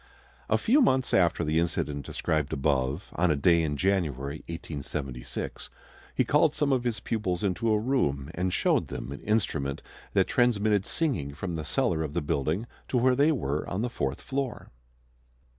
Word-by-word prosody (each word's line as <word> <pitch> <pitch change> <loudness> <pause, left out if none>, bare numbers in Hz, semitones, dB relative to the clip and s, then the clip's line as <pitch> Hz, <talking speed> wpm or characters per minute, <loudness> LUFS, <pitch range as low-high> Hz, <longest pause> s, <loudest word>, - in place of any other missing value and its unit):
A - - +4
few 270 +7 +4
months 130 - +2
after 85 -2 +3
the 80 +1 +2
incident 75 -4 -1
described 75 -2 -1
above, 70 +3 0
on 90 +1 +3
a 75 - +3
day 85 +4 +4
in 75 -3 -1
January, 75 -7 0
1876, 70 -6 -5 0.5
he - - +2
called 150 +1 +3
some 145 -2 +2
of 125 -2 0
his 120 -2 -1
pupils 105 -4 -2
into 105 +4 +1
a 105 - +4
room 80 - 0
and 90 +1 -1
showed - - +2
them 65 - -6
an 70 - -7
instrument 95 -11 -1 0.3
that - - +4
transmitted 105 -4 +2
singing 110 - -1
from 90 +2 -4
the 80 -2 -3
cellar 80 +2 0
of 75 -2 -4
the - - +1
building 75 - -1 0.2
to 130 - 0
where 125 +1 +4
they 145 +4 +4
were 75 - -1
on 95 +5 -2
the 125 - -2
fourth 70 - -2
floor. 135 -4 -4
85 Hz, 175 wpm, -28 LUFS, 70-115 Hz, 0.5 s, A